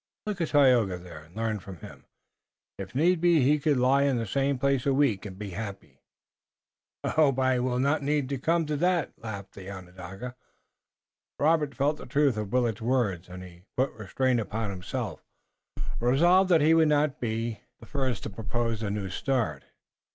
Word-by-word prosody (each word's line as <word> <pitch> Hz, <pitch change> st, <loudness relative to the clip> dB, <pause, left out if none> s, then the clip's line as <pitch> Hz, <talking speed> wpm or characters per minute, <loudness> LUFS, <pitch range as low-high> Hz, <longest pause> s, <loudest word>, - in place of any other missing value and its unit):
Look 205 Hz, -4 st, -3 dB
at 165 Hz, -, +1 dB
Tayoga 125 Hz, -, +4 dB
there 85 Hz, -3 st, -11 dB
and 85 Hz, +4 st, -22 dB
learn 110 Hz, -1 st, -1 dB
from 95 Hz, -1 st, -10 dB
him. -, -, -12 dB, 0.7 s
If 95 Hz, +3 st, -7 dB
need 165 Hz, +4 st, +3 dB
be 170 Hz, -3 st, +4 dB
he 145 Hz, +4 st, +3 dB
could 145 Hz, -1 st, +2 dB
lie 130 Hz, +2 st, +4 dB
in 140 Hz, -3 st, +2 dB
the 115 Hz, -, -1 dB
same 135 Hz, +5 st, 0 dB
place 140 Hz, 0 st, +1 dB
a 135 Hz, -, +3 dB
week 125 Hz, -8 st, +1 dB
and 95 Hz, -2 st, -10 dB
be 100 Hz, -1 st, -6 dB
happy." 100 Hz, +1 st, -7 dB, 1.0 s
"I -, -, -1 dB
hope 150 Hz, -4 st, +3 dB
the 130 Hz, 0 st, +2 dB
need 125 Hz, -, +1 dB
will 125 Hz, 0 st, 0 dB
not 140 Hz, +4 st, +1 dB, 0.4 s
come," 165 Hz, +2 st, +2 dB, 0.5 s
laughed 100 Hz, -3 st, -7 dB
the 95 Hz, -1 st, -9 dB
Onondaga. 95 Hz, +5 st, -8 dB, 1.0 s
Robert 150 Hz, -1 st, +2 dB
felt 145 Hz, +2 st, +1 dB
the -, -, -10 dB
truth 140 Hz, -1 st, +2 dB
of 105 Hz, -2 st, -4 dB
Willet's 120 Hz, -4 st, +1 dB
words, 110 Hz, -8 st, 0 dB
and 90 Hz, +1 st, -8 dB
he 90 Hz, -1 st, -13 dB, 0.2 s
put 130 Hz, +2 st, +1 dB
restraint 120 Hz, +4 st, 0 dB
upon 110 Hz, -1 st, -3 dB
himself, 95 Hz, -, -5 dB, 0.8 s
resolved 175 Hz, +10 st, +4 dB
that 165 Hz, -4 st, +5 dB
he 155 Hz, +2 st, +5 dB
would 165 Hz, -1 st, +5 dB
not 150 Hz, -2 st, +2 dB
be 115 Hz, -2 st, -3 dB, 0.2 s
the 115 Hz, -, -13 dB
first 130 Hz, -4 st, -2 dB
to -, -, -4 dB
propose 115 Hz, +2 st, -2 dB
the 110 Hz, -2 st, -2 dB
new 100 Hz, -1 st, -3 dB
start. 110 Hz, -, -1 dB
125 Hz, 175 wpm, -27 LUFS, 100-140 Hz, 1.0 s, that